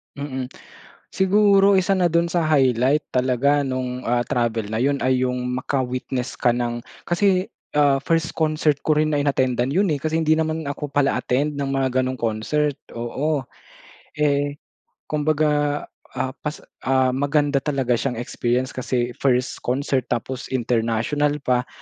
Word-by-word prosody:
Mm. 130 -3 -4 0.6
Siguro 195 0 +4
isa 195 +1 +1
na 175 -3 +2
dun 170 0 +2
sa 170 0 0
highlight 135 -2 +2
talaga 130 +3 +2
nung, 130 -1 -3
ah, 120 0 +1
travel 115 -3 0
na 110 - -4
yun 140 +5 +1
ay 130 0 +1
yung 125 0 -1
maka-witness 130 -1 -2
ka 120 - +2
ng 120 0 -2 0.2
kasi, 185 +1 +2 0.3
ah, 145 -2 +5
first 165 +1 0
concert 155 -1 +2
ko - - +1
rin 155 -1 +1
na 145 - +2
inattendan 130 -2 +1
yun, 195 +5 +2
eh, 150 -3 +1
kasi 160 +1 0
hindi 155 -1 +3
naman 160 -1 -1
ako 145 0 -4
pala 140 -1 +2
attend 140 +4 0
ng 140 -1 -2
mga 130 -1 +1
ganong 130 0 -3
concert. 125 +6 0 0.2
Oo. 130 +4 -2 0.7
Eh, 145 0 +1 0.5
kumbaga, 150 -1 +1 0.3
ah, 130 - -1
pas 150 0 -5 0.2
ah, 130 -1 +3
maganda 145 +1 +1
talaga 135 -4 0
siyang 135 -3 -2
experience 125 +2 -1
kasi 125 -1 -2
first 130 -1 +1
concert, 130 0 -1
tapos 125 +2 -3
international 120 +5 0
pa, 125 -1 +1
135 Hz, 150 wpm, -22 LUFS, 125-150 Hz, 0.7 s, ah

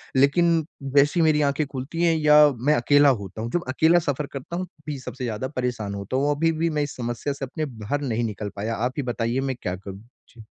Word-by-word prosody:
लेकिन 160 +4 +3 0.3
वैसी 145 +4 +4
मेरी 155 -2 +3
आँखें 145 +1 +1
खुलती 140 +5 -4
हैं 165 -1 +4
या 150 -1 +7
मैं 130 +6 +1
अकेला 145 +3 +5
होता 100 +2 -7
हूँ। 115 +1 -4
जब 175 - 0
अकेला 160 +6 +4
सफ़र 145 +1 -1
करता 140 +5 -6
हूँ 185 +1 -2
तब 150 -3 -14
ही 145 -2 -4
सबसे 130 0 -7
ज़्यादा 115 +1 -3
परेशान 120 -5 -2
होता 100 +5 -3
हूँ। 145 +2 +2
अभी-भी 165 +2 +1
मैं 150 -2 0
इस 145 - -5
समस्या 120 +3 -3
से 140 0 -5
अपने 155 +4 -4
बाहर 125 +2 -4
नहीं 120 -4 -1
निकल 105 -2 -4
पाया। 110 +3 -3
आप 125 +3 -1
ही 145 - -1
बताइए 120 0 -1
मैं 135 -1 -2
क्या 90 - -2
करूँ? 95 +1 -9 0.3
जी। 115 -2 -14
135 Hz, 225 wpm, -24 LUFS, 120-150 Hz, 0.3 s, या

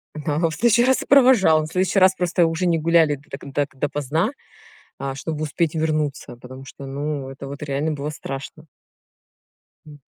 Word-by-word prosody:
Да, 150 -1 -3
он 165 +1 +2
в 160 - -6
следующий 235 +1 +3
раз 260 +1 +2
и - - -7
провожал, 250 - +5
мы - - -4
в - - -13
следующий 185 +2 +1
раз 190 0 +5
просто 175 -1 +1
уже 165 +2 -1
не 170 -2 +2
гуляли 165 -2 +3
до 145 +1 -20
т 140 0 -8
так 140 -2 -2
до 145 - 0
поздна, 150 - -1 0.7
а 135 -1 -4
чтобы 155 +2 -4
успеть 155 +1 -1
вернуться, 155 -5 -2
потому 130 +2 -12
что, 140 +1 -10
ну, 140 0 -4
это 135 +1 -9
вот 140 +2 -8
реально 145 +2 -1
было 145 0 -4
страшно. 150 +1 -8 1.2
М. 145 -1 -13
155 Hz, 195 wpm, -22 LUFS, 140-170 Hz, 1.2 s, провожал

